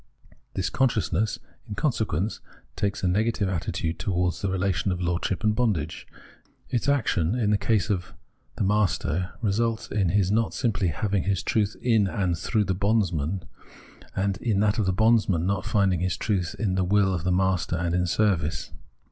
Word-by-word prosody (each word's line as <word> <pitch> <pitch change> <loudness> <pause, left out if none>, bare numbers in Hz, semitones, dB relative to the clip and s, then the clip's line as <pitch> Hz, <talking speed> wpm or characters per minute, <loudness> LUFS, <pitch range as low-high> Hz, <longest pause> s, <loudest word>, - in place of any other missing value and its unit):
This 95 - -1
consciousness 110 -4 +1 0.3
in 105 - -4
consequence 110 - -1 0.4
takes 100 -2 -2
a - - +2
negative 105 +2 +1
attitude 85 -2 -2
towards 90 -4 -1
the 100 - 0
relation 95 -1 0
of 90 - -2
lord 90 0 -1
ship 90 -3 -2
and 105 0 +2
bondage. 95 -10 -1 0.6
Its 125 +2 0
action, 110 - +1
in 110 -4 +1
the 105 - +4
case 105 0 +1
of 90 -3 -3 0.4
the - - -1
master, 95 -4 0
results 110 +2 0
in 100 -4 +1
his 100 0 +2
not 110 +1 +1
simply 105 -7 0
having 100 +2 -1
his 95 -1 0
truth 105 -2 0
in 110 -5 +3
and 95 -4 0
through 105 +6 0
the 95 - 0
bondsman; 95 -4 0 0.7
and, 100 0 0
in 110 -3 0
that 105 +1 +2
of 105 - +1
the - - +3
bondsman, 110 -3 +3
in 90 - -1
not 100 -1 -1
finding 100 -5 +2
his 90 0 -1
truth 95 -6 -1
in 105 -5 0
the 95 0 +1
will 95 +1 +3
of 90 - -2
his 90 +2 0
master 95 -1 +1
and 85 0 -1
in 90 0 +1
service. 85 - 0
95 Hz, 180 wpm, -26 LUFS, 90-105 Hz, 0.7 s, the